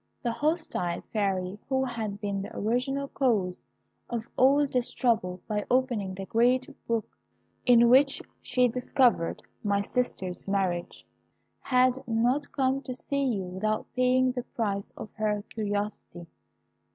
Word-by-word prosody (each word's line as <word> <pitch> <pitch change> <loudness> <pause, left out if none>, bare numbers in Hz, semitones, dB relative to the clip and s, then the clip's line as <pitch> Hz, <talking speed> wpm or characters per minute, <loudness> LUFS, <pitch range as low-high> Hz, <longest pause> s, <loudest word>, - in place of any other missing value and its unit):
The 240 - +1
hostile 300 - -1
Fairy, 195 -2 -1
who 265 -1 +2
had 220 -5 -4
been 200 -2 -2
the 195 - -7
original 255 +6 0
cause 200 - 0 0.5
of 235 -1 -3
all 280 +3 +5
this 250 -3 -1
trouble 185 -8 0
by 210 -1 -1
opening 240 -7 +1
the 195 0 -6
great 245 +4 +2 0.2
book 230 -2 0 0.6
in 240 -1 +7
which 270 +3 +5 0.2
she 250 -1 +2
discovered 245 -6 +1 0.2
my 200 -1 +1
sister's 195 -7 -3
marriage, 185 -3 -1 0.5
had 255 0 +3
not 245 +5 +1
come 265 0 +1
to 255 -2 -6
see 280 +2 -2
you 220 -7 0
without 190 +4 -2
paying 255 0 +3
the 250 0 -3
price 205 -5 -3
of 215 - -8
her 210 -1 0
curiosity. 205 -4 -3
230 Hz, 135 wpm, -28 LUFS, 200-255 Hz, 0.6 s, in